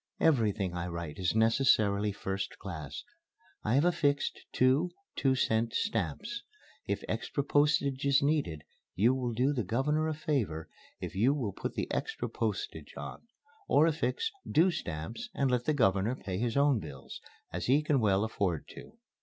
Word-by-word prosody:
Everything 110 - +2
I 90 0 -3
write 85 0 -5
is 90 +2 0
necessarily 110 -3 +3
first 95 0 -4
class. 80 -8 -6 0.6
I 110 +3 +1
have 145 +4 +4
affixed 145 -5 +1
two 130 +7 +3 0.3
two 135 -1 +2
cent 115 -2 +1
stamps. 225 +1 -2 0.5
If - - -1
extra 140 - -2
postage 145 -2 +2
is 140 -1 +4
needed 140 - 0 0.3
you 115 +7 +4
will 125 -2 -1
do 130 +5 +2
the 120 -5 -1
Governor 150 - +1
a 155 - -1
favor 110 - -1 0.3
if - - -5
you 120 +9 +3
will 115 -9 -2
put - - -5
the - - -1
extra 445 0 -2
postage - - -3
on. - - -7 0.5
Or 150 - +5
affix 305 - 0 0.2
'due' 170 +5 +4
stamps, 85 - -5
and 135 -2 +1
let 125 -1 +1
the 155 - +2
Governor 110 -2 +2
pay 95 -6 -4
his 120 +2 0
own 140 -4 +4
bills, - - -9 0.3
as - - -3
he 140 +4 +4
can 150 -3 +2
well 100 -3 +3
afford 100 -7 -1
to. 230 - -12
125 Hz, 160 wpm, -31 LUFS, 100-145 Hz, 0.6 s, Or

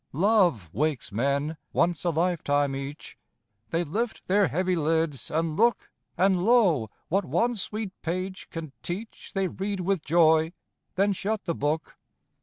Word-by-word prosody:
Love 175 - +3
wakes 150 -6 -1
men, 140 +7 0 0.2
once 170 -2 +1
a 175 - +2
lifetime 145 -5 +1
each; 140 +2 -7 0.5
They 165 +6 0
lift 220 +9 -3
their 200 +1 +4
heavy 185 +4 0
lids, 160 -3 0
and 160 0 -1
look; 235 +5 +2 0.3
And, 185 0 +3
lo, 190 - +4 0.2
what 195 +4 +2
one 180 - +1
sweet 215 -1 -2
page 185 +3 -4
can 165 -3 -6
teach, 200 +6 -6
They 195 -1 +1
read 195 +1 -3
with 190 -1 0
joy, 160 0 +4 0.4
then 200 +2 +3
shut 205 +2 -2
the 170 - 0
book. 155 +2 -2
170 Hz, 145 wpm, -27 LUFS, 155-195 Hz, 0.5 s, their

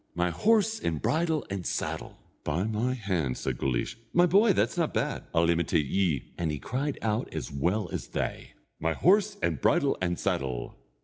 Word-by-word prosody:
My 90 0 +1
horse, 220 - +2
and 80 -2 -1
bridle, 160 - +1
and 95 -2 -3
saddle!" - - -3 0.3
"By 90 - 0
my 110 +4 0
hand," 90 - -1
said 65 -2 -3
Guleesh, 65 - -1 0.2
"my 175 +1 +6
boy, 200 +5 +5
that's - - +1
not 170 -3 0
bad. - - -1
I'll 85 0 +3
imitate 85 -2 +2
ye," 80 -4 0
and 85 -2 0
he 75 - -2
cried 135 - -2
out 110 +1 -1
as - - -5
well 90 +9 0
as - - -4
they: - - -4 0.3
"My 80 +1 +1
horse, 200 - +3
and - - 0
bridle, 145 -6 +3
and 90 -1 0
saddle! 65 -3 -2
100 Hz, 180 wpm, -28 LUFS, -, 0.3 s, my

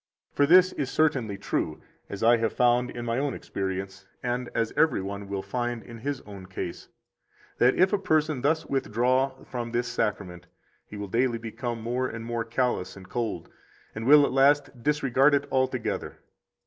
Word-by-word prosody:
For 145 - +3
this 185 +3 +6
is 135 -3 -3
certainly 135 -11 +1
true, 100 - -2 0.3
as 100 - -5
I 120 +1 +6
have 115 -1 -1
found 125 0 +3
in 120 0 -6
my 115 +1 0
own 140 -2 -1
experience, 95 0 -5 0.2
and 125 0 -2
as 115 -1 0
every 160 -4 +3
one 100 +1 -5
will 100 -1 -4
find 120 +3 -3
in 115 -1 -11
his 140 +2 -3
own 100 -3 -11
case, 90 -2 -6 0.7
that 125 +1 +5
if 185 +3 +3
a 205 - +2
person 155 -6 +1
thus 160 +4 +1
withdraw 130 +1 0
from 120 -2 -5
this 120 +1 0
Sacrament, 95 -5 -3 0.4
he 105 - -9
will 100 0 -5
daily 120 +3 +1
become 115 +1 -5
more 125 +2 -1
and 115 -1 -7
more 115 -1 -2
callous 115 -5 -1
and 95 -1 -13
cold, 120 -2 -3 0.5
and 110 +2 -5
will 145 0 +8
at - - -2
last 135 -1 +3
disregard 145 0 +3
it 140 0 0
altogether. 130 -2 -1
120 Hz, 175 wpm, -27 LUFS, 110-135 Hz, 0.7 s, will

